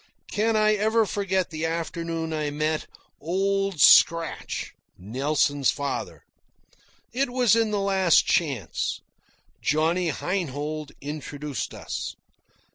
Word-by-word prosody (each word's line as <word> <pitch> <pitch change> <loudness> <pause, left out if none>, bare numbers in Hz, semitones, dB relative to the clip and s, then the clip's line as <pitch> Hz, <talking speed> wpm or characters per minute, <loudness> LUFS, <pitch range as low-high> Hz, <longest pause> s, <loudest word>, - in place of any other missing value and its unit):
Can 220 +2 +1
I 215 0 +4
ever 220 +2 +2
forget 190 -3 -1
the 160 0 -2
afternoon 165 0 -3
I 155 -1 -1
met 155 +1 -1 0.3
"Old 195 +2 -1
Scratch," 165 +2 +4 0.2
Nelson's 140 +6 0
father? 140 -1 -3 0.9
It 270 +2 0
was 245 -3 +3
in 225 -1 +2
the 210 -1 0
Last 190 -3 +3
Chance. 140 - -1 0.6
Johnny 165 +3 +1
Heinhold 155 -3 -3
introduced 145 -1 -5
us. - - -5
165 Hz, 105 wpm, -25 LUFS, 150-195 Hz, 0.9 s, I